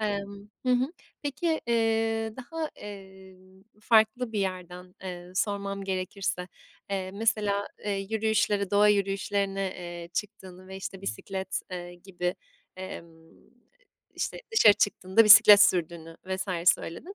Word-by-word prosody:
Emm. 200 -1 -4 0.2
Hı 255 - +4
hı. 255 +6 +1 0.3
Peki, 315 +3 -1
eee, 225 -1 +1
daha, 310 +5 -5
eee, 190 -2 -11 0.4
farklı 225 +2 +3
bir 210 - -1
yerden, 180 -1 -5
eee, 180 -1 -8
sormam 200 0 -2
gerekirse, 185 -1 -3 0.4
eee, 190 -1 -2
mesela, 205 -2 0 0.2
eee, 210 - -1 0.2
yürüyüşlere, 210 -3 +1
doğa 205 +1 +5
yürüyüşlerine, 195 -1 0 0.2
eee, 175 -1 -8
çıktığını 185 -3 -6
ve, 190 - -8
işte, 195 0 -7
bisiklet, 190 - -4
eee, 175 -1 -7
gibi, 180 0 -4 0.4
emm, 165 -3 -10 0.8
işte, - - -4
dışarı 225 - +7
çıktığında 205 +1 +2
bisiklet 210 -1 +10
sürdüğünü 165 -3 0
vs. 185 -3 +2
söyledin. 330 - -9
195 Hz, 120 wpm, -27 LUFS, 185-215 Hz, 0.8 s, bisiklet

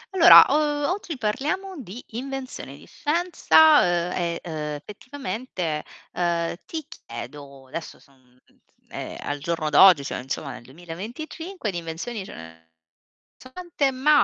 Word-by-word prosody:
Allora, 345 -1 +10
uhm, 295 0 +1
oggi 355 -6 -4
parliamo 300 - -2
di 220 +2 -9
invenzioni, 265 +2 -6
di - - -16
scienza, 315 -1 +4
uhm, 175 0 +1
e, 170 -2 -2
uhm, 150 -3 -4
effettivamente, 210 - -5 0.3
ehm, 170 -1 -1
ti 315 -3 -5
chiedo 140 -2 -10
adesso 165 +5 -7
son 130 -2 -26 0.5
ehm, - - -7
al 145 0 -3
giorno 155 0 -2
d'oggi, 160 -1 +7
cioè - - -4
insomma 135 +2 -5
nel 125 0 -9
2025 215 - -7
di 175 - -5
invenzioni 175 +7 -5
ce - - -10
ne 80 0 -13 0.7
so' 255 - -15
tante, 335 -3 -1
ma 285 +3 +4
190 Hz, 135 wpm, -24 LUFS, -, 0.7 s, Allora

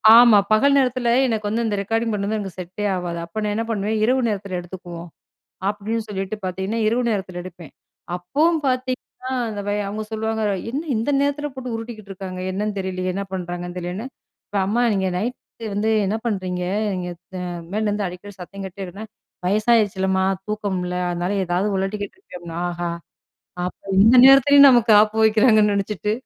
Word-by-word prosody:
ஆமா, 235 -3 +8
பகல் 280 +6 +5
நேரத்தில 255 -2 +1 0.2
எனக்கு 215 -3 -1
வந்து 230 +2 0
இந்த 210 - 0
ரெக்கார்டிங் 225 +2 -1
பண்றது 205 +2 -1
எனக்கு 195 -3 -7
செட்டே 185 +4 -5
ஆகாது. 175 -2 -4
அப்ப 175 +6 -6
நான் 210 -1 0
என்ன 225 - 0
பண்ணுவேன். 215 0 -1
"இரவு 255 +3 +3
நேரத்தில 200 -3 -3
எடுத்துக்குவோம்." 175 -1 -9 0.6
அப்படின்னு 215 +2 -3
சொல்லிட்டு 195 0 -3
பார்த்தீங்கன்னா, 190 +5 -2
இரவு 240 +3 +1
நேரத்தில 190 -4 -3
எடுப்பேன். 175 -4 -11 0.4
அப்போவும் 300 - +1
பார்த்தீங்கன்னா, 255 0 -3 0.2
அந்த 205 -1 -4 0.3
அவங்க 215 +2 -4
சொல்லுவாங்க 220 0 -2 0.3
"என்ன 290 +5 -2
இந்த 230 +6 -1
நேரத்தில 290 +1 -1
போட்டு 250 -3 -5
உருட்டிக்கிட்டுருக்காங்க? 200 -5 -7
என்னன்னு 205 +1 -2
தெரியலையே, 185 -1 -2
என்ன 200 - -3
பண்ணுறாங்கன்னு 175 0 -5
தெரியலேன்னு" 180 +8 -5 0.4
இப்ப 205 - -3
"அம்மா 240 +4 +1
நீங்க 190 -1 0
நைட் 240 +6 -2 0.4
வந்து 210 +2 0 0.2
என்ன 205 +3 0
பண்றீங்க? 185 -5 -2 0.3
நீங்க 180 -1 -4 0.6
மேலேருந்து 210 -1 0
அடிக்கடி 185 +3 -9
சத்தம் 195 +2 -8
கேட்டுடேஇருக்குனா." 195 +3 -7 0.4
"வயசாயிடுச்சுல்லம்மா 200 -3 +2 0.2
தூக்கம் 205 -3 -2
இல்ல. 180 0 -3 0.2
அதனால 175 +3 -1
ஏதாவது 180 +4 0
உழட்டிக்கிட்டு 205 - -3
இருக்கேன்." 180 - -11
அப்படினா 170 -1 -7
ஆஹா! 175 0 -3 0.8
அப்ப 180 - -6 0.2
இந்த 225 +5 +7
நேரத்திலேயும் 280 +1 +8
நமக்கு 240 -3 +4
ஆப்பு 215 +1 0
வெக்கிறாங்கன்னு 215 -1 +5
நெனச்சிட்டு 200 0 -1
205 Hz, 155 wpm, -22 LUFS, 185-225 Hz, 0.8 s, ஆமா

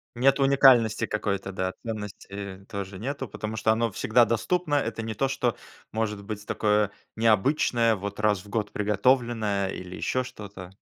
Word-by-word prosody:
Нет 135 +3 +3
уникальности 135 -5 +5
какой-то, 100 -2 -2
да, 95 0 -2
ценности 100 -2 -6
тоже 100 -3 -6
нету, 135 +4 -4
потому 105 +2 -5
что 110 - +2
оно 115 0 +1
всегда 115 +3 +3
доступно. 150 +8 0
Это 125 -5 -1
не 110 0 -3
то, 135 +6 0
что 125 -3 0 0.4
может 105 -2 -2
быть 105 0 -6
такое 105 -1 +2 0.2
необычное, 115 +1 +3
вот 100 +1 -6
раз 105 -3 +2
в 100 - -15
год 105 -1 -2
приготовленное 105 -2 +1
или 90 -1 -7
ещё 130 0 -1
что-то. 100 -6 -9
110 Hz, 155 wpm, -26 LUFS, 100-120 Hz, 0.4 s, уникальности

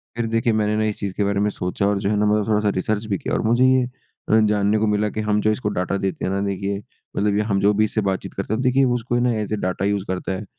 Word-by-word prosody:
फ़िर 115 -1 -1
देखिए 115 +1 +1
मैंने 105 -1 +1
ना 110 - +1
इस 105 -1 -2
चीज़ 100 -2 -3
के 105 - +2
बारे 100 0 0
में 105 +1 +2
सोचा 90 0 -2
और 100 -1 +1
जो 100 0 -1
है 105 - +1
ना 105 - +2
मतलब 105 0 +2
थोड़ा-सा 105 -1 +2
रीसर्च 105 +3 -1
भी 100 -3 -1
किया। - - -4
और - - +1
मुझे 120 +3 +4
ये 130 0 +4 0.5
अ, 110 - +5
जानने 105 -1 +2
को 110 0 +1
मिला 105 0 +1
कि 110 - -4
हम 105 0 +2
जो 110 - +2
इसको 110 -1 -1
डाटा 90 +2 -1
देते 95 -1 -2
हैं 95 - -1
ना 100 - -1
देखिए 100 0 -2 0.4
मतलब 100 0 +1
कि 105 - +2
हम 100 - +2
जो 100 +2 +3
भी 105 +1 +2
इससे 110 +1 -1
बातचीत 95 - -5
करते 100 +2 -3
हैं 110 - -1
देखिए 130 +1 +3 0.2
उसको 120 +1 -3
ये 120 - +2
ना 125 -1 +2
ऐस 105 0 -3
अ - - +2
डेटा 90 +1 -1
यूज़ 100 -1 0
करता 95 +1 -3
है 95 +3 -4
105 Hz, 305 wpm, -22 LUFS, 100-110 Hz, 0.5 s, अ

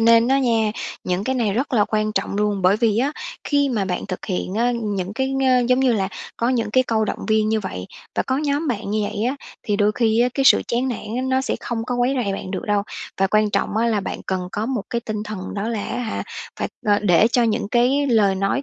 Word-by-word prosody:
nên 230 +1 +5
á 270 +1 +4
nha, 225 -5 +2 0.3
những 180 +2 -1
cái 260 - 0
này 225 -5 +1
rất 255 +6 -1
là 210 -4 +4
quan 215 0 0
trọng - - -1
luôn, 205 -2 0
bởi 185 +3 +5
vì 220 -1 +2
á 280 +4 +1 0.3
khi 285 -1 +2
mà 215 -6 0
bạn 180 -1 -3
thực 185 - -5
hiện 185 0 -2
á 240 +2 +2
những 200 -2 -2
cái, 265 +2 -1
ơ, 255 -2 +4
giống 255 +1 +4
như 255 -2 +4
là, 195 -3 0 0.3
có 235 - 0
những 230 -4 0
cái 255 +3 +4
câu 220 -1 +1
động - - -3
viên 215 0 +3
như 220 0 +1
vậy, 95 - -5 0.3
và - - +1
có 260 - -1
nhóm 295 +1 0
bạn 220 -4 -2
như 215 0 0
vậy 210 +2 -2
á 260 +3 0 0.3
thì 205 - 0
đôi 210 0 +3
khi 225 -1 +2
á 245 - +4
cái 275 - +1
sự - - +7
chán 245 +3 0
nản 245 - -2 0.2
á, 255 - -1
nó 260 0 +2
sẽ 265 - -2
không 225 -2 -3
có 250 - -2
quấy 245 +2 +2
rầy 200 - -1
bạn 190 - -5
được 190 - -3
đâu. 205 -1 +2 0.4
Và 195 - +5
quan 215 +1 +2
trọng 200 +1 0
á 230 +1 +2
là 220 -3 +1
bạn 195 - -5
cần 185 -1 -2
có 215 +2 -2
một 245 -5 -1
cái 235 - -1
tinh 215 -2 -4
thần 210 -3 -6
đó 205 +3 -2
là 220 -3 -2
á 245 - -3
hả, 230 -3 -3 0.3
phải, - - -2 0.2
ờ, 205 0 +4
để 195 0 +4
cho 245 - +4
những 225 -2 0
cái 255 +5 +2
lời 210 -6 +3
nói 195 +8 0
220 Hz, 265 wpm, -22 LUFS, 205-250 Hz, 0.4 s, sự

